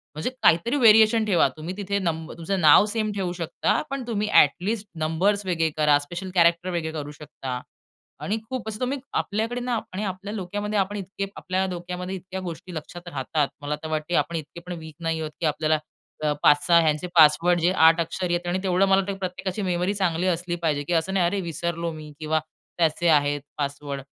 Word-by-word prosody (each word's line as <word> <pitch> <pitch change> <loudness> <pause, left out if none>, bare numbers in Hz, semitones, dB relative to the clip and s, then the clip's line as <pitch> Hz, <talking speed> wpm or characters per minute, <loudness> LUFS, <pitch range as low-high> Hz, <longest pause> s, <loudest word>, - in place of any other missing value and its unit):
म्हणजे 155 +10 -2
काहीतरी 170 - +4
व्हेरिएशन 225 -2 +6
ठेवा. 195 -5 +4
तुम्ही 165 +4 -6
तिथे 200 0 -1
नंबर 165 -3 -3
तुमचं 190 +4 -2
नाव 155 +6 +7
सेम 215 0 -1
ठेवू 190 -3 -2
शकता. 170 -3 -1
पण 275 -1 -3
तुम्ही 215 -3 -1
ॲटलीस्ट 200 +8 +3 0.2
नंबर्स 195 +6 +1
वेगळे 165 -3 +1
करा, 150 -1 +5
स्पेशल 175 +6 -6
कॅरेक्टर 170 +1 +3
वेगळे 170 -3 -2
करू 150 -2 -5
शकता. 135 -4 -7 0.6
आणि 215 +2 -1
खूप 255 -4 -4
असं 215 0 -6
तुम्ही 260 +2 -1 0.2
आपल्याकडे 225 +4 -2
ना 245 -2 -1
आणि 195 +3 -3
आपल्या 195 +2 -5
डोक्यामध्ये 205 +2 -2
आपण 200 +1 -1 0.3
आपल्या 185 +1 -1
डोक्यामध्ये 180 +1 -5
इतक्या 190 +1 -7
गोष्टी 180 0 -7
लक्षात 175 +3 -8
राहतात. 145 -1 -1
मला 145 +1 -2
तर 160 - -4
वाटतं 155 +2 -2
आपण 170 - 0
इतके 160 +1 -6
पण 180 - -5
वीक 160 -1 -11
नाही 165 -1 -1
आहोत 155 -1 -4
की 170 - -1
आपल्याला 155 0 +1 0.4
अ, 150 - +2
5-6 150 +4 +5
ह्यांचे 155 +2 0
पासवर्ड 170 +2 +6
जे 170 +2 +3
8 165 +1 +6
अक्षर 180 +3 -3
आहेत 175 0 -1
आणि 180 +2 0
तेवढं 185 0 +3
मला 195 0 +5
वाटतं, 195 +1 -2
की - - -9
प्रत्येकाची 185 +2 -4
मेमरी 180 +1 0
चांगली 185 -3 0
असली 175 0 -1
पाहिजे 150 -3 0
की 175 - 0
असं 170 +3 +1
नाही, 190 -2 +3
अरे 195 +4 0
विसरलो 170 0 -3
मी 155 -1 -9
किंवा 155 0 0 0.4
त्याचे 170 0 +1
आहेत 145 -2 +3 0.2
पासवर्ड. 140 -1 -4
175 Hz, 195 wpm, -24 LUFS, 160-195 Hz, 0.6 s, नाव